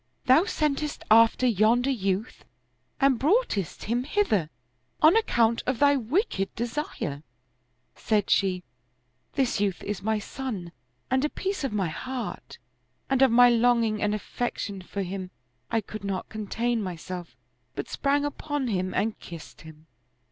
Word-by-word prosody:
Thou 275 +7 +6
sentest 300 -5 -1
after 230 +3 +6
yonder 235 +3 +3
youth 200 -2 -2 0.6
and 270 -4 +3
broughtest 300 - +1
him 240 +3 0
hither, 265 - +1 0.5
on 310 +5 +6
account 235 - +2
of 255 -1 +1
thy 285 +2 +5
wicked 255 - -1
desire." 235 - -3 0.7
Said 210 -3 0
she, 185 -2 +2 0.3
" 125 +1 -45
This 260 -6 +1
youth 200 -3 -1
is 205 -2 -4
my 220 +1 0
son 210 -6 -5 0.4
and 260 +1 +2
a 300 - +1
piece 390 -1 -3
of 270 - -1
my 195 -5 0
heart; 255 +9 -6 0.5
and 270 -1 +2
of 265 - +7
my 245 +1 +7
longing 230 -2 +2
and 210 0 +1
affection 210 -2 -4
for 195 +2 -4
him, 185 0 -5 0.4
I 225 - +1
could 215 0 -9
not 195 -2 -3
contain 225 +2 -2
myself, 180 -1 -6 0.4
but - - -4
sprang 285 +1 0
upon 290 -2 -3
him 185 -3 -1
and 220 +1 0
kissed 170 -2 -11
him." 155 0 -14
225 Hz, 145 wpm, -26 LUFS, 195-265 Hz, 0.7 s, of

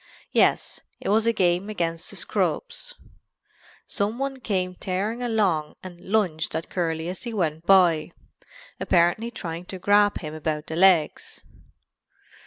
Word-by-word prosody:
Yes, - - +2 0.2
it - - -4
was 220 +2 +3
a - - +5
game 185 -1 +1
against 165 -5 -2
the - - -7
scrubs. - - -2 0.9
"Some 205 +3 -2
one 270 0 -3
came 185 -6 -1
tearing 195 +6 -3
along 195 -11 0
and 175 -2 -10
lunged 185 -8 0
at 160 - -4
Curly 165 -2 -1
as 180 +1 -5
he 235 -2 -5
went 160 -4 -2
by, 175 -5 +5 0.7
apparently 175 +6 +2
trying 170 -6 -6
to 190 - -7
grab 205 +2 +3
him 155 -2 -6
about 155 -1 -3
the 160 - -5
legs. 175 -3 +3
185 Hz, 140 wpm, -25 LUFS, 165-215 Hz, 0.9 s, a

